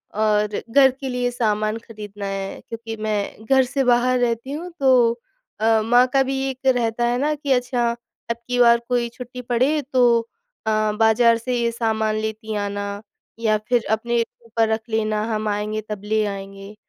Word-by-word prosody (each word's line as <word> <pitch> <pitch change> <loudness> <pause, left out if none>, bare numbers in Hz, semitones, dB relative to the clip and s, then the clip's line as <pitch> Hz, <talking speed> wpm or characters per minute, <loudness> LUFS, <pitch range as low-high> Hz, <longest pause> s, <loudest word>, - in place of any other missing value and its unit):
और 210 -1 +1
घर 270 +2 +6
के 265 +1 -7
लिए 250 -1 -1
सामान 215 -2 0
खरीदना 205 -2 -8
है। 195 0 -4
क्योंकि 230 -1 -6
मैं 215 0 -3
घर 265 +3 +4
से 270 +2 -1
बाहर 250 0 +3
रहती 235 +2 -1
हूँ 335 +5 -5
तो 245 -3 +4 0.4
अ, 220 0 +4
माँ 245 +3 +4
का 270 - +5
भी 270 0 -2
एक 265 0 -8
रहता 240 -2 +2
है 240 +1 +1
ना 300 +3 +1
कि 285 -1 -4
अच्छा, 245 -1 0 0.4
अबकी 235 +1 -4
बार 235 -1 +6
कोई 240 -1 +1
छुट्टी 250 +1 -9
पड़े 255 +5 +1
तो 240 -2 +4 0.5
अ, - - +3 0.2
बाज़ार 225 +2 +4
से 245 +2 -3
ये 235 -1 +1
सामान 220 -2 0
लेती 220 0 -4
आना, 200 0 -3 0.4
या 220 -2 +2
फिर 245 -2 +2
अपने 235 +2 0 0.3
ऊपर 225 0 +1
रख 220 0 0
लेना, 215 -1 0
हम 215 0 -2
आएँगे 210 +1 -2
तब 210 -2 -5
ले 215 +1 +1
आएँगे। 195 0 -7
230 Hz, 175 wpm, -22 LUFS, 215-250 Hz, 0.5 s, घर